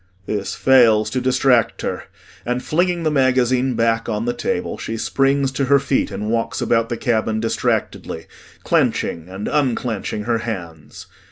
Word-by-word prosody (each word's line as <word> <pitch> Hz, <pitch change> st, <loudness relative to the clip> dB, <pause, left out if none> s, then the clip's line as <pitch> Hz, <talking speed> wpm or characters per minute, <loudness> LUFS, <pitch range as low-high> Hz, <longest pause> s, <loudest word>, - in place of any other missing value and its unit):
This 100 Hz, -1 st, -3 dB
fails 115 Hz, -5 st, +4 dB
to 130 Hz, -, -1 dB
distract 130 Hz, -2 st, +2 dB
her, -, -, -3 dB, 0.4 s
and 125 Hz, +1 st, -2 dB
flinging 175 Hz, +1 st, 0 dB
the 155 Hz, -, +1 dB
magazine 130 Hz, -2 st, +2 dB
back 115 Hz, 0 st, +1 dB
on 110 Hz, +1 st, -2 dB
the 120 Hz, -, 0 dB
table, 230 Hz, -, -3 dB
she 115 Hz, -, -4 dB
springs 135 Hz, +3 st, +1 dB
to 135 Hz, +1 st, -1 dB
her 140 Hz, +2 st, +5 dB
feet 140 Hz, 0 st, 0 dB
and 105 Hz, +1 st, -4 dB
walks 115 Hz, 0 st, -1 dB
about 115 Hz, -1 st, +1 dB
the 120 Hz, -, -2 dB
cabin 110 Hz, -2 st, 0 dB
distractedly, 110 Hz, -6 st, -2 dB, 0.4 s
clenching 85 Hz, +1 st, 0 dB
and 95 Hz, +2 st, -5 dB
unclenching 120 Hz, -7 st, -1 dB
her 115 Hz, +1 st, 0 dB
hands. 85 Hz, -10 st, -7 dB
120 Hz, 155 wpm, -20 LUFS, 110-135 Hz, 0.4 s, her